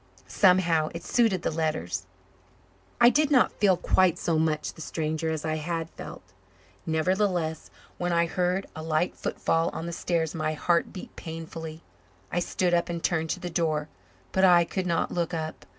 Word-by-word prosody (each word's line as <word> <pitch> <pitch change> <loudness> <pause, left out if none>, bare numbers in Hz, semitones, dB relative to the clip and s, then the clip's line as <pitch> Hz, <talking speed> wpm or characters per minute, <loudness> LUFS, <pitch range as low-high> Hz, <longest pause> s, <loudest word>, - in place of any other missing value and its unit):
Somehow, 175 -5 +3
it 170 - -6
suited 215 -5 +2
the - - 0
letters. 155 - -2 0.9
I 240 - +8
did 300 +1 +3
not 260 -5 +4
feel 195 -4 +3
quite 185 -1 +3
so 165 -2 0
much 155 -1 0
the - - -11
stranger 160 0 -2
as 160 -1 -3
I 155 0 0
had 165 +1 -3
felt. - - -9 0.6
Nevertheless, 170 0 0 0.3
when 175 0 0
I 170 0 +3
heard 180 +2 0
a 160 - -6
light 160 +2 0
footfall 165 0 0
on 165 - -4
the 170 - -4
stairs 165 -2 -1
my 155 -1 -1
heart 170 +2 +1
beat 185 - -9
painfully. 160 0 -7 0.5
I 175 - +1
stood 175 0 0
up 170 0 +2
and 170 -1 -4
turned 160 -2 0
to - - -2
the 175 - -5
door, 155 -2 0 0.4
but 190 - +1
I 175 -2 +7
could 185 +1 -3
not 170 -1 0
look 170 -1 -1
up. 160 -1 -5
165 Hz, 175 wpm, -27 LUFS, 160-180 Hz, 0.9 s, I